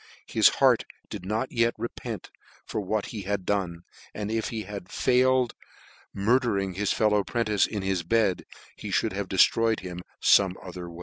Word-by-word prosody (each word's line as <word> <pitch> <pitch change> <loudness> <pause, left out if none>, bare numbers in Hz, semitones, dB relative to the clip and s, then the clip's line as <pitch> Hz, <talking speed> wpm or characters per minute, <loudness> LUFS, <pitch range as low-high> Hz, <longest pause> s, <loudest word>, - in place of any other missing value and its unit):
his - - +5
heart - - +4 0.3
did - - -6
not 110 +5 -1
yet 115 0 +2
re 120 - -2
' - - -36
c 125 - -5
lent 110 -5 -6 0.3
for 110 - -3
what 105 +1 -1
he 105 - -4
had 100 -1 -3
done, 90 -4 -1 0.3
and 105 0 -3
if 110 -1 -1
he 110 -2 -4
had 100 -3 -8
failed 130 +1 +3
of - - -60 0.5
murdering 100 -3 +1
his 100 +2 -1
fellow 105 -2 +2
'prentice 105 -1 +1
in 105 -3 -4
his 95 -2 0
bed, 100 +1 +1 0.3
he - - -7
<c - - +3
fhould - - 0
have - - -3
dejftroyed 115 -1 +3
him 90 -1 -6 0.2
fome 95 -2 +5
other 90 -1 -7
way." 85 0 -11
105 Hz, 195 wpm, -27 LUFS, 95-115 Hz, 0.5 s, his